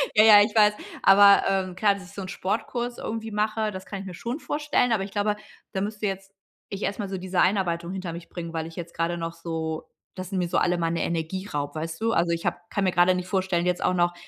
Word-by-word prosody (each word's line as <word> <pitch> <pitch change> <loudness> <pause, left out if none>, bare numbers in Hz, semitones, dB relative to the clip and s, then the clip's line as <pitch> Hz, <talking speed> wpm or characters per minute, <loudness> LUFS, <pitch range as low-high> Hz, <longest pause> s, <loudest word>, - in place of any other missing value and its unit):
Ja, 215 - +7
ja, 210 -2 +9
ich 210 - -2
weiß 210 -1 +6 0.3
aber, 200 +1 +7
ähm, 190 -2 -1
klar, 200 +1 +3
dass 195 - -10
ich 180 - -15
so 200 - -6
'n 185 - -6
Sportkurs 240 +6 -3
irgendwie 225 0 -4
mache, 215 +1 0
das 190 -1 -8
kann 195 - -5
ich - - -9
mir 185 - -7
schon 235 - -4
vorstellen, 295 -5 0
aber 215 -4 +2
ich 195 - -7
glaube, 205 0 0 0.4
da 190 - -1
müsste 210 +1 -3
jetzt 195 0 -4 0.4
ich 200 +1 -5
erst 200 - -2
mal 200 -2 -3
so 190 - -3
diese 185 0 0
Einarbeitung 175 -3 +1
hinter 185 -3 -5
mich 170 0 -9
bringen, 170 -1 -6
weil 160 -1 -3
ich 165 - -12
jetzt 170 -1 -7
grade 170 +1 -1
noch 165 0 -4
so 160 -1 -4 0.2
das 185 -1 -7
sie 195 - -3
mir 175 -2 0
so - - +1
alle 175 0 +2
meine 165 0 -1
Energie 170 +4 -3
raubt, 145 -2 -4
weißt 165 +2 -5
du? 225 0 +2
Also, 170 -6 +2
ich 165 0 -2
habe - - 0
kann 200 - -1
mir 185 - +2
grade 175 +1 +4
nicht 180 0 -4
vorstellen, 185 -2 0
jetzt 180 0 0
auch - - +2
noch 175 -1 +2
190 Hz, 260 wpm, -25 LUFS, 170-205 Hz, 0.4 s, ja